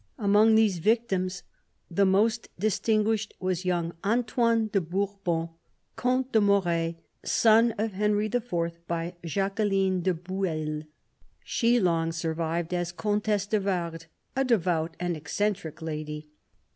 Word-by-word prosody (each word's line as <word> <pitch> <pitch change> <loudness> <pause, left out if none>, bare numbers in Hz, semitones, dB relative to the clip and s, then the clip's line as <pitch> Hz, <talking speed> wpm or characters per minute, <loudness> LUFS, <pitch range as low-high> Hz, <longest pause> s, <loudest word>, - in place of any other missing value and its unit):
Among 215 0 +4
these 215 -5 +3
victims 190 -3 0 0.4
the 195 +3 +2
most 215 +4 +2
distinguished 215 +2 0
was 185 -1 -2
young 175 -2 0
Antoine 230 +1 +2
de 200 -2 +1
Bourbon, 180 -1 -2 0.5
Comte 255 +1 0
de 220 - +4
Moret, 175 -5 +2 0.3
son 225 +1 +4
of 215 +1 -1
Henry 210 +1 +1
IV. 245 +2 -2 0.4
by 170 +1 -2
Jacqueline 195 +1 0
de 185 0 +1
Bueil: 160 -4 -3 0.6
she 240 0 +2
long 165 -4 +1
survived 165 +1 -2
as 175 -1 -1
Comtesse 210 +1 0
de 210 +1 +1
Vardes, 170 -4 -3 0.3
a 270 - +2
devout 175 -9 0
and 175 -1 -1
eccentric 165 +1 -3
lady. 150 -1 -5
195 Hz, 120 wpm, -27 LUFS, 170-215 Hz, 0.6 s, Among